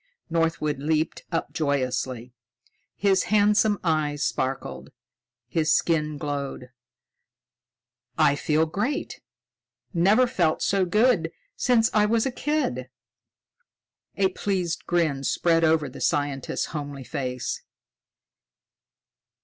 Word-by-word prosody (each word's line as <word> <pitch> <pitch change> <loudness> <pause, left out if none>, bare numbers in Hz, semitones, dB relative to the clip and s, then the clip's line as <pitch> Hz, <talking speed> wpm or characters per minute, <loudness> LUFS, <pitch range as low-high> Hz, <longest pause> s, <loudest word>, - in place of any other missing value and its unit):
Northwood 160 -3 0
leaped 155 +2 0
up 165 - -2
joyously. 130 -5 -1 0.6
His 195 -2 +2
handsome 210 0 +3
eyes 150 -3 0
sparkled, 70 - -3 0.6
his 155 +4 +1
skin 155 -3 0
glowed. 140 -3 -4 1.5
"I 140 - +4
feel 155 +2 +1
great! 215 - -3 0.7
Never 195 +8 +4
felt 175 -10 0
so 195 -2 +2
good 210 -3 +2 0.2
since 245 - +3
I 210 -1 +4
was 225 +2 +2
a 265 - 0
kid." 250 - -2 1.3
A 195 -1 +2
pleased 185 -3 -2
grin 160 -6 +1
spread 165 +4 +2
over 160 -2 +3
the 130 - -10
scientist's 145 -2 -1
homely 145 -3 -5
face. 130 -3 -4
160 Hz, 100 wpm, -25 LUFS, 140-200 Hz, 1.5 s, I